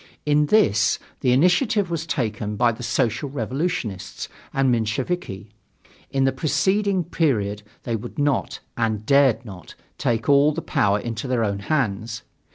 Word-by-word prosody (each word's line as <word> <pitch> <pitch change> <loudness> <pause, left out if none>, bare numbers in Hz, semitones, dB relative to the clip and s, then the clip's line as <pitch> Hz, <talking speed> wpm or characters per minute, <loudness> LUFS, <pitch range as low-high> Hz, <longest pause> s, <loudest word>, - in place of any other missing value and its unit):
In 150 0 +3
this, 110 - +3 0.2
the 125 - +2
initiative 180 - +3
was 165 -1 -3
taken 105 -6 -2
by 120 +2 +3
the 110 - -9
Social 120 +3 0
Revolutionists 120 - -3 0.2
and 135 0 +1
the - - +4
Mensheviki. 110 - -3 0.6
In 135 -1 +1
the 135 - +3
preceding 190 +5 +1
period 110 - 0 0.2
they 115 - -2
would 115 +2 -7
not, 145 -2 0
and 110 -2 -1
dared 140 -3 +4
not, 95 -5 -11 0.2
take 115 0 0
all 145 +2 +5
the 165 - -3
power 100 0 +1
into 115 +3 -4
their 125 -3 +1
own 100 -2 -1
hands. 110 -2 -2
125 Hz, 150 wpm, -23 LUFS, 110-150 Hz, 0.6 s, all